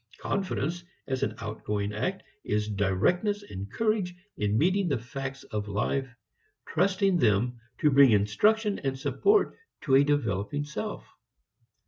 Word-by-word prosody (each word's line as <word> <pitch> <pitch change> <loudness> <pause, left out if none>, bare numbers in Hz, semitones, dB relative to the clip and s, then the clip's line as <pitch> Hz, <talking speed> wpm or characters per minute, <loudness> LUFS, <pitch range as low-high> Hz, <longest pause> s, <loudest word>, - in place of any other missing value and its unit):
Confidence 175 -3 -2 0.2
as 130 -1 -2
an 105 - -1
outgoing 105 -2 -3
act 130 - -2 0.2
is 105 0 0
directness 110 - +1
and 100 - -7
courage 215 -5 0 0.2
in 105 +1 0
meeting 185 - +2
the 145 - +1
facts 135 +3 -6
of 105 -1 -4
life, 120 +6 -1 0.6
trusting 190 +2 +2
them 120 +1 +2 0.2
to 150 -2 +4
bring 140 -1 +7
instruction 200 - +2
and 135 -1 -2
support 405 - +2 0.3
to 135 - -1
a 135 +1 +7
developing 145 -3 0
self. 150 +9 -5
135 Hz, 130 wpm, -28 LUFS, -, 0.6 s, bring